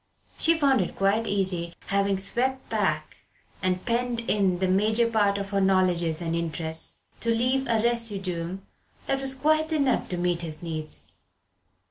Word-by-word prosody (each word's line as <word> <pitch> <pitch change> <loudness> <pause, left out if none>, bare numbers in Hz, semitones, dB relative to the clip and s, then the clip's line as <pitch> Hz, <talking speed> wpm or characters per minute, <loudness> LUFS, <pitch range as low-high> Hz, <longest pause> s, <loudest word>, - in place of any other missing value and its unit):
She 330 0 +4
found 275 -7 +3
it 180 - -3
quite 200 +4 +1
easy, 185 -4 -1
having 200 0 +1
swept 250 +7 -1
back - - -1 0.4
and 185 0 -1
penned 240 0 0
in 200 -5 +1
the 190 +1 0
major 215 +5 +3
part 205 -3 +2
of 200 0 -5
her 200 -1 +1
knowledges 180 -4 +2
and 165 0 -1
interests, 160 -1 -3 0.2
to 230 - -2
leave 255 +4 +1
a 230 -2 +2
residuum 195 -6 -1 0.4
that 270 0 -1
was 270 0 +1
quite 310 +3 +1
enough 280 -5 +1
to 180 - -3
meet 175 -1 0
his 160 -1 -4
needs. 155 -2 -6
200 Hz, 155 wpm, -26 LUFS, 180-235 Hz, 0.4 s, She